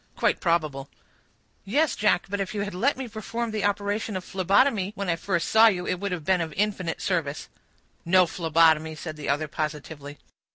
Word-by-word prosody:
"Quite - - +1
probable." 155 -6 0 0.7
"Yes, 285 +10 +1
Jack, 210 -4 +2
but 200 +1 -3
if 195 +2 -3
you 205 - -1
had 200 -1 -4
let 250 +11 +1
me 265 -1 -5
perform 230 +1 -4
the 215 -2 -2
operation 205 0 -1
of 185 - -6
phlebotomy 195 +2 +2
when 200 -2 -3
I - - +1
first 170 0 -2
saw 220 +1 +7
you, 180 -5 +1
it 180 - -2
would 200 0 -3
have 170 -4 -4
been 185 -2 +2
of 160 -2 -4
infinite 195 -4 -1
service." 160 -6 -2 0.5
"No 185 +1 +5
phlebotomy," 160 -2 +2
said 155 0 -7
the 150 -2 -6
other, 145 +2 0
positively. 150 -1 -5
185 Hz, 190 wpm, -25 LUFS, 160-205 Hz, 0.7 s, saw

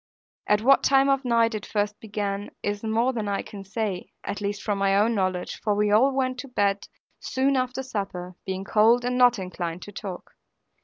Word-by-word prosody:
At 210 +1 +2
what 275 +3 +6
time 275 0 +4
of 275 0 +2
night 230 -2 +2
it 215 -2 -4
first 210 0 -2
began 205 -2 -3
is 205 0 -2
more 230 +4 +1
than 220 -4 -3
I 200 -1 -1
can 200 -2 -9
say, 195 -2 -4
at 205 - -4
least 205 0 -3
from 205 -2 -1
my 195 0 +3
own 220 +3 +3
knowledge, 185 -3 -2
for 210 -2 +1
we 210 0 +2
all 245 +7 +5
went 260 -1 -1
to 275 - -6
bed 200 -5 0 0.3
soon 270 +1 0
after 255 0 -1
supper, 195 -7 -5
being 190 0 -4
cold 225 +4 +4
and 250 0 0
not 245 -1 +5
inclined 180 -2 -5
to 205 - -9
talk. 190 -2 -7
210 Hz, 200 wpm, -25 LUFS, 200-245 Hz, 0.3 s, what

